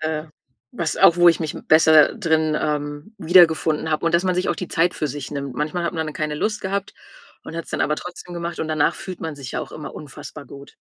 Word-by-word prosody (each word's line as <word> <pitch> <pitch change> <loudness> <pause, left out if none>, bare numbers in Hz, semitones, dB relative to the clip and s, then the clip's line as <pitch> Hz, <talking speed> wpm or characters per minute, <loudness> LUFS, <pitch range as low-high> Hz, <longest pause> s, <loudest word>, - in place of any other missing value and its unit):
äh, 155 0 -2 0.5
was 170 -2 -2
auch 170 - +6
wo 175 0 +7
ich 165 - +4
mich 155 -2 -2
m - - -10
besser 155 -1 +6
drin, 160 -6 +1
ähm, 145 +6 -3
wiedergefunden 160 -2 +4
habe, 155 +2 0
und 165 - +1
dass 175 +2 +3
man 185 -1 +1
sich 180 - -1
auch - - 0
die 180 - -5
Zeit 170 +2 +1
für 155 - -2
sich 140 -1 -6
nimmt. 140 -3 -5
Manchmal 155 +4 -2
hat - - -1
man 160 -1 -2
dann 155 - -6
keine 155 -1 -2
Lust 210 +6 -2
gehabt 195 +1 -3 0.5
und - - -8
hat's 165 - -5
dann - - -1
aber 150 0 0
trotzdem 180 0 -9
gemacht, 170 0 -4
und 160 - -3
danach 155 +1 +2
fühlt 185 -2 -8
man 160 -2 -4
sich 135 -3 -8
ja - - -2
auch - - -8
immer 155 - -8
unfassbar 145 -1 -10
gut. 140 0 -13
160 Hz, 250 wpm, -22 LUFS, 150-175 Hz, 0.5 s, wo